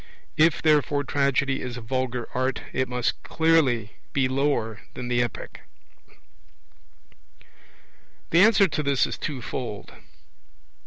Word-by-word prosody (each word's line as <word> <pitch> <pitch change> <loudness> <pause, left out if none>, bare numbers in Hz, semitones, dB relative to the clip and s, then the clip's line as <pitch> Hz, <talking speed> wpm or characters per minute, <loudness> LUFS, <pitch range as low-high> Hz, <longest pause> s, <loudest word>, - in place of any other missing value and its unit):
If, 160 0 +3
therefore, 150 -2 +3
Tragedy 140 -1 0
is 125 -1 -5
a - - -7
vulgar 125 0 -2
art, 130 +1 -1
it 130 -1 -1
must 125 -1 -1
clearly 140 -10 +1 0.2
be 135 -2 +2
lower 130 -5 -1
than 125 -1 -5
the 120 0 +2
Epic. 120 - -5 2.7
The 170 - +6
answer 205 -2 +6
to 155 - -2
this 140 -2 +2
is - - -6
twofold. 125 -5 -5
130 Hz, 115 wpm, -25 LUFS, 125-150 Hz, 2.7 s, The